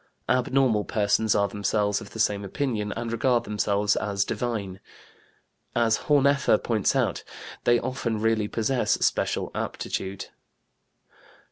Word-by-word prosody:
Abnormal 130 -4 +2
persons 105 +1 +1
are 100 0 +3
themselves 105 +1 0
of 105 - -10
the 115 - -10
same 105 -2 +1
opinion 105 -1 -2
and 115 0 -4
regard 120 +1 +2
themselves 105 0 0
as 100 -2 -1
divine. 105 -6 -3 1.0
As 115 -2 +3
Horneffer 140 -4 +4
points 110 -4 0
out, - - 0 0.4
they 120 0 +5
often 120 -3 -2
really 110 -1 +1
possess 120 +4 0
special - - 0
aptitude. 95 0 -4
110 Hz, 120 wpm, -26 LUFS, 105-120 Hz, 1.0 s, they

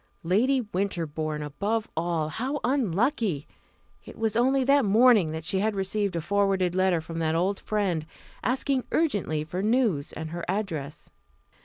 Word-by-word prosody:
Lady 240 +10 +2
Winterbourne, 165 -7 -3
above 205 +10 -2
all! 165 -1 -1
How 260 - -3
unlucky! 230 - 0 0.6
It - - -12
was 225 -1 -1
only 260 +3 +3
that 280 +1 +4
morning 215 -4 +5
that 160 0 -5
she 190 - 0
had 215 +1 0
received 195 0 -1
a 170 - -1
forwarded 195 -1 +1
letter 185 -2 +2
from 165 +1 -6
that 160 -1 0
old 190 +4 0
friend, 185 -7 -1 0.4
asking 260 +2 0
urgently 205 - 0
for 175 +4 -4
news 215 - +1
and 160 0 -6
her 170 0 -5
address. 165 -7 -4
195 Hz, 150 wpm, -27 LUFS, 165-225 Hz, 0.6 s, morning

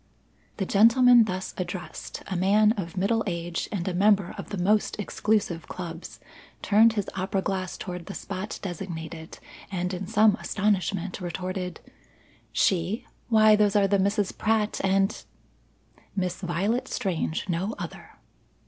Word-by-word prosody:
The 195 - -1
gentleman 230 +4 +6
thus 185 -2 -4
addressed 180 0 -6
a 190 - -4
man 205 +4 +4
of 195 -5 -4
middle 225 +4 +1
age 170 -1 -3
and 190 -4 -3
a 185 - -1
member 195 0 +3
of - - -8
the 205 - -4
most 210 +4 +1
exclusive 205 -5 -1
clubs 170 -2 -7 0.4
turned 220 +2 +5
his 205 -3 -2
opera 190 0 -1
glass 190 -2 -3
toward 180 -2 -6
the 195 - -6
spot 195 +2 -5
designated, 165 -3 -6 0.3
and 180 0 -2
in 185 +1 -4
some 215 0 +4
astonishment 195 -2 -1
retorted: 180 +1 -4 0.7
"She? 190 +4 +1 0.2
Why 215 -2 +6
those 210 -1 +2
are 200 -1 +4
the 200 0 +2
Misses 200 +1 +1
Pratt 215 -1 0
and 195 +2 +1 0.5
" - - -32
"Miss 180 -2 -2
Violet 200 +9 -1
Strange; 170 -5 -2
no 185 +5 -2
other." - - -8
195 Hz, 140 wpm, -26 LUFS, 180-210 Hz, 0.7 s, gentleman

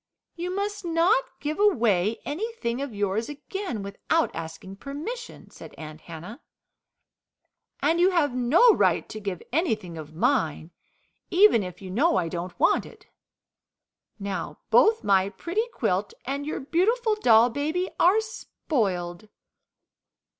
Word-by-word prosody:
"You 350 +1 -4
must 405 0 -3
not 350 +9 +3
give 300 +3 -3
away 225 - +2
anything 300 - -3
of 280 -2 -4
yours 205 +3 -1
again 295 - -5
without 200 +11 -1
asking 165 +4 -7
permission," 325 - -7
said - - -12
Aunt 155 0 -9
Hannah. 175 - -10 1.4
"And 335 +1 +3
you 360 +2 +5
have 320 -8 +1
no 285 - +5
right - - +2
to 215 - -6
give 195 -4 -5
anything 215 - -1
of 155 0 -10
mine, 165 - 0 0.6
even 375 - +5
if 180 0 -8
you 185 - -7
know 260 - +2
I 175 -3 0
don't 175 +2 -6
want - - +3
it. - - -16 1.1
Now 200 -2 -4
both 445 +1 +5
my 195 -1 +3
pretty 380 - -2
quilt 460 - -1
and 280 +2 -3
your - - -3
beautiful 435 - +1
doll 240 - +5
baby 310 +8 -1
are 370 +5 +5
spoiled." 210 - -3
270 Hz, 130 wpm, -26 LUFS, -, 1.4 s, you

